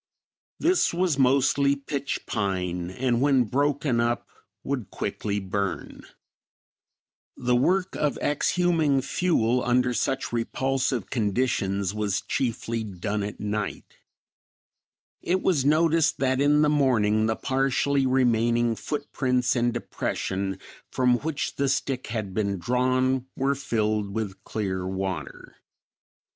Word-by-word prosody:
This 350 Hz, -, +2 dB
was 175 Hz, -5 st, +1 dB
mostly 135 Hz, +1 st, +3 dB
pitch 140 Hz, 0 st, -4 dB
pine 90 Hz, -4 st, -2 dB
and 120 Hz, +4 st, 0 dB
when 135 Hz, -2 st, +4 dB
broken 140 Hz, +1 st, 0 dB
up 120 Hz, 0 st, 0 dB, 0.4 s
would 130 Hz, -7 st, -3 dB
quickly 105 Hz, -1 st, -3 dB
burn. 100 Hz, 0 st, -4 dB, 1.3 s
The 125 Hz, 0 st, +1 dB
work 180 Hz, +9 st, +2 dB
of 150 Hz, -2 st, 0 dB
exhuming 155 Hz, -2 st, +1 dB
fuel 125 Hz, -6 st, +1 dB
under 125 Hz, 0 st, +2 dB
such 135 Hz, +1 st, -1 dB
repulsive 130 Hz, 0 st, -1 dB
conditions 100 Hz, -4 st, 0 dB
was 105 Hz, -3 st, -1 dB
chiefly 115 Hz, -2 st, -2 dB
done 105 Hz, +1 st, -3 dB
at 100 Hz, 0 st, -5 dB
night. 105 Hz, 0 st, -4 dB, 1.2 s
It 185 Hz, +2 st, 0 dB
was 150 Hz, -8 st, +2 dB
noticed 160 Hz, +1 st, +3 dB
that 130 Hz, 0 st, +1 dB
in 150 Hz, +1 st, +4 dB
the -, -, +4 dB
morning 115 Hz, -7 st, +2 dB
the 110 Hz, -, +1 dB
partially 135 Hz, +1 st, +1 dB
remaining 120 Hz, -2 st, +2 dB
foot 145 Hz, +5 st, -5 dB
prints 125 Hz, -2 st, +1 dB
and 120 Hz, 0 st, +2 dB
depression, 95 Hz, -4 st, -3 dB, 0.3 s
from 125 Hz, -1 st, +2 dB
which 155 Hz, -1 st, -3 dB
the 140 Hz, -1 st, +1 dB
stick 135 Hz, -1 st, -1 dB
had 110 Hz, -4 st, -4 dB
been 100 Hz, -1 st, -1 dB
drawn, 130 Hz, +5 st, +1 dB
were 135 Hz, +1 st, +1 dB
filled 110 Hz, -6 st, -1 dB
with 100 Hz, -4 st, -4 dB
clear 95 Hz, -4 st, -3 dB
water. 95 Hz, 0 st, -5 dB
125 Hz, 120 wpm, -26 LUFS, 105-140 Hz, 1.3 s, when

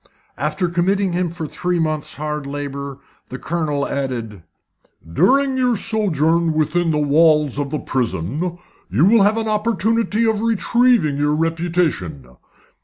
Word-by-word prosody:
After 150 Hz, +6 st, -1 dB
committing 185 Hz, +3 st, 0 dB
him 180 Hz, 0 st, 0 dB
for 165 Hz, -1 st, -6 dB
three 180 Hz, +3 st, -2 dB
months' 155 Hz, -2 st, -2 dB
hard 150 Hz, -1 st, -4 dB
labour, 140 Hz, -1 st, -5 dB, 0.3 s
the 125 Hz, -, -6 dB
Colonel 150 Hz, -3 st, -2 dB
added 120 Hz, -8 st, -4 dB, 0.7 s
"During 270 Hz, -, +3 dB
your 250 Hz, -3 st, +2 dB
sojourn 170 Hz, -7 st, +1 dB
within 155 Hz, +3 st, 0 dB
the 155 Hz, -, +1 dB
walls 150 Hz, -1 st, +3 dB
of 140 Hz, -1 st, -3 dB
a 155 Hz, -, -1 dB
prison 135 Hz, -, -2 dB, 0.3 s
you 115 Hz, -, +3 dB
will 220 Hz, +2 st, +5 dB
have 205 Hz, +3 st, +3 dB
an 225 Hz, -1 st, -2 dB
opportunity 220 Hz, +1 st, 0 dB
of 220 Hz, -2 st, +1 dB
retrieving 230 Hz, -, +2 dB
your 145 Hz, +1 st, +1 dB
reputation. 165 Hz, -, -1 dB
165 Hz, 135 wpm, -20 LUFS, 145-200 Hz, 0.7 s, will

